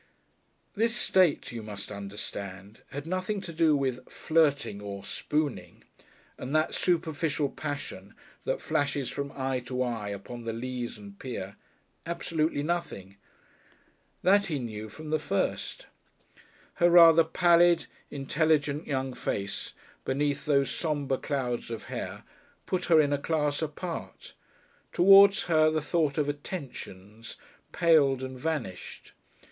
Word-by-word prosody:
This 230 +2 +1
state, 185 - +2
you 120 -2 -6
must 105 -1 -7
understand, 100 0 -7
had 140 +1 -6
nothing 185 +4 -2
to 170 - -7
do 160 -2 +4
with 130 -2 -2
"flirting" 145 -10 +1
or 100 -1 -6
"spooning" 150 +3 -3 0.6
and 135 +4 -4
that 155 0 +2
superficial 160 -4 0
passion 105 -11 -6 0.3
that - - -2
flashes 145 -4 0
from 140 0 -4
eye 130 -1 -1
to 125 0 -1
eye 115 -4 -3
upon 110 +4 -7
the 115 0 -3
leas 120 +1 -4
and 100 -1 -12
pier 100 -6 -6 0.5
absolutely 165 -3 -1
nothing. 125 - -3 1.1
That 200 +2 +4
he 155 -5 -1
knew 110 -4 -6
from 155 +7 -9
the 155 - +2
first. 140 -9 -2 1.0
Her 175 - +6
rather 165 -1 +8
pallid, 170 +1 +4 0.2
intelligent 150 +1 0
young 135 -2 -2
face, 100 -4 -4 0.3
beneath 140 +1 -1
those 140 -2 +3
sombre 145 -5 -1
clouds 125 -6 -2
of 115 -2 -5
hair, - - -5 0.4
put 180 -1 -1
her 165 -2 +5
in 145 -1 +3
a 145 - 0
class 150 -1 0
apart; 160 +2 -6 0.6
towards 195 +2 +7
her 155 -2 +4
the 155 0 0
thought 155 -2 0
of 150 -2 +1
"attentions" 115 - -7 0.4
paled 145 -6 +4
and 130 -1 -6
vanished. 140 - -4
145 Hz, 130 wpm, -28 LUFS, 120-160 Hz, 1.1 s, rather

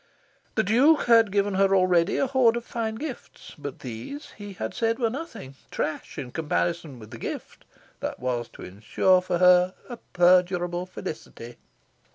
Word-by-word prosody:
The 220 - +2
Duke 260 +10 +4
had 230 -3 +5
given 200 0 +1
her 195 0 +3
already 180 -2 +3
a - - +2
horde 250 -3 +3
of 235 - -6
fine 225 -2 -3
gifts; 270 +1 -8
but 145 -2 -8
these, 130 - -7
he 205 -1 -9
had 110 -11 -5
said, 230 0 0
were 230 -3 0
nothing 235 - -7 0.2
trash 155 - -4
in 130 -4 -6
comparison 160 -1 -2
with 110 -2 -13
the - - -9
gift - - -7 0.3
that - - -4
was 125 -2 -2
to - - -11
ensure 110 - +2
for 180 -1 -1
her 180 +1 +5
a 240 - -6
perdurable 180 -1 +2
felicity. 150 -10 -8
185 Hz, 165 wpm, -25 LUFS, 155-225 Hz, 0.3 s, had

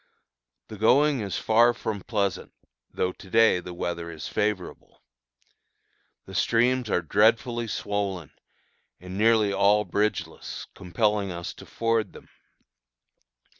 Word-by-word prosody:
The 110 - -9
going 140 +5 +4
is 100 -3 -3
far 115 +2 +4
from 110 -4 -4
pleasant, 100 -3 -2 0.4
though 90 - -1
to 95 - -15
day 110 -3 +4
the 90 0 -8
weather 85 -1 -4
is 80 -3 -7
favorable. 105 -4 -3 1.2
The - - -11
streams 120 0 +1
are 90 - +1
dreadfully 115 - +2
swollen 100 -6 -3 0.7
and 90 +1 -9
nearly 110 -1 +3
all 105 +2 +3
bridgeless, 105 +1 -3
compelling 100 +1 -1
us 85 -1 -6
to - - -14
ford 115 -1 -1
them. - - -14
105 Hz, 120 wpm, -26 LUFS, 90-115 Hz, 1.2 s, going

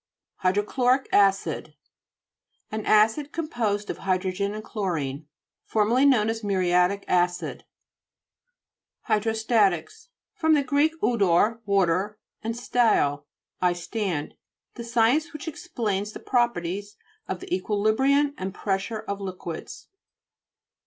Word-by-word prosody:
HYDROCHLORIC 245 +8 +1
ACID 195 -1 +2 1.0
An 215 0 -3
acid 225 +8 +3
com 330 -2 -3
posed 210 -7 -1
of - - -8
hydrogen 190 +2 -1
and 215 - -6
chlorine, 160 - -3 0.4
formerly 230 +6 +3
known 230 -6 +4
as 225 0 -2
muriatic 185 0 +2
acid. 175 0 0 1.4
HYDHOSTA'TICS 225 - +1 0.3
fr. 320 - -3 0.2
gr. 285 +2 0 0.2
'uddr, 215 0 +3
wa 200 -2 +4
ter, 190 +5 -1 0.3
stad, 230 - +2 0.4
I 180 -1 +3
stand. 175 -3 -3 0.4
The - - -8
scfence 240 +8 +2
which 305 +2 -8
explains 215 - -3
the - - -8
properties 205 -5 -1 0.3
of 185 - -3
the - - -6
equi 190 +3 -2
librium 270 +8 +2
and 190 +1 -4
pressure 200 +2 -2
of 200 -2 -5
liquids. 180 -4 -7
210 Hz, 110 wpm, -25 LUFS, 185-235 Hz, 1.4 s, known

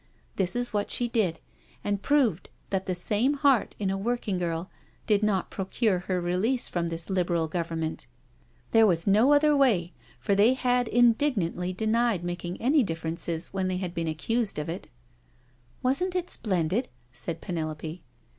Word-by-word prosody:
This 185 +1 -1
is 245 -1 -2
what 205 -1 -1
she 245 - +1
did, 215 -8 0 0.4
and 205 -1 -1
proved 255 - +1 0.2
that 190 -1 -1
the 185 - 0
same 215 +10 +1
heart 275 -4 +2
in 195 -2 -1
a 195 - -1
workgirl 185 -7 -2 0.4
did 210 -2 +3
not 205 -4 0
procure 195 0 0
her 180 0 -2
release 185 +9 0
from 170 -1 -2
this 165 0 -5
Liberal 175 -3 +1
Govern 165 0 -3
ment. 160 0 -4 0.6
There 225 -1 +6
was 170 -3 +1
no 215 +8 +4
other 295 +1 +5
way— 215 -12 +2 0.3
for 200 - 0
they 215 +6 +5
had 250 -2 +1
indig 245 +4 +3
nantly 180 -1 -2
denied 220 -3 +1
making 175 0 -4
any 280 +5 +3
differences 165 -3 -2
when 190 -1 -1
they 185 -1 -1
had 180 -2 -4
been 165 -2 -2
accused 210 +7 0
of 150 +1 -3
it.'^ 175 +3 -5 0.5
" 125 0 -35
Wasn't 355 +9 0
it 360 -1 -1
splendid," 190 +2 0 0.3
said 160 +7 -4
Penelope. 160 -1 -5
190 Hz, 165 wpm, -27 LUFS, 170-235 Hz, 0.6 s, There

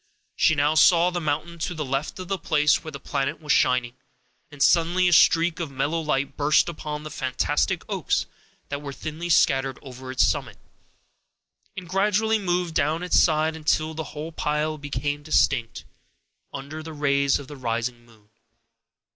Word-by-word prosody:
She 160 - +3
now 145 +1 +2
saw 170 +2 +5
the 175 -1 -3
mountain 165 +3 -3
to 175 +2 -3
the 155 -2 -3
left 135 +3 -3
of 185 -1 -7
the 195 0 -2
place 150 -2 +2
where 155 - -7
the 140 - -8
planet 140 +2 -2
was 150 -2 -3
shining, 125 -1 +2 0.6
and 145 - -13
suddenly 175 +2 +3
a 175 - +3
streak 170 +2 +4
of 165 -3 -3
mellow 140 +5 -1
light 140 -3 -1
burst 150 +1 +3
upon 150 -3 -5
the 155 - -8
fantastic 130 -2 -1
oaks - - -1 0.4
that 140 0 -4
were 140 -1 -7
thinly 160 +4 -6
scattered 135 -5 +2
over 130 -1 -10
its 130 - +3
summit, - - -2 1.2
and 180 -2 -7
gradually 210 +4 +1
moved 175 -3 -1
down 155 +3 0
its 180 - +3
side, 155 0 +2
until 155 0 0
the 160 0 -5
whole 155 +3 -7
pile 150 0 -2
became 145 0 -3
distinct 130 -5 0 0.7
under 140 +3 -7
the 160 0 -8
rays 140 -2 +2
of 140 - -10
the 145 - -9
rising 120 -1 -3
moon. 110 -3 -23
150 Hz, 170 wpm, -24 LUFS, 140-165 Hz, 1.2 s, saw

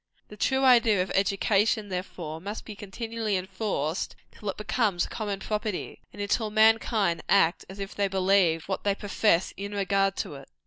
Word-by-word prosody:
The 210 - -10
true 265 +5 +1
idea 230 -7 +5
of 185 - -7
education, 200 +2 +2
therefore, 175 -4 -5
must 205 +4 -6
be 215 - -8
continually 220 +1 -3
enforced, 185 -4 -3 0.2
till 210 - -6
it 190 - -4
becomes 210 -4 0
common 205 -4 -4
property, 210 -2 -3
and - - -13
until 210 +2 0
mankind 220 -4 +3
act 165 +2 +3
as 190 - -9
if 195 0 -6
they 200 -1 0
believed 185 -4 +2
what 190 - -3
they 200 -1 +1
profess 200 -3 +1
in 200 +1 -5
regard 195 -1 +1
to - - -4
it. 135 -1 -11
200 Hz, 170 wpm, -27 LUFS, 190-215 Hz, 0.2 s, idea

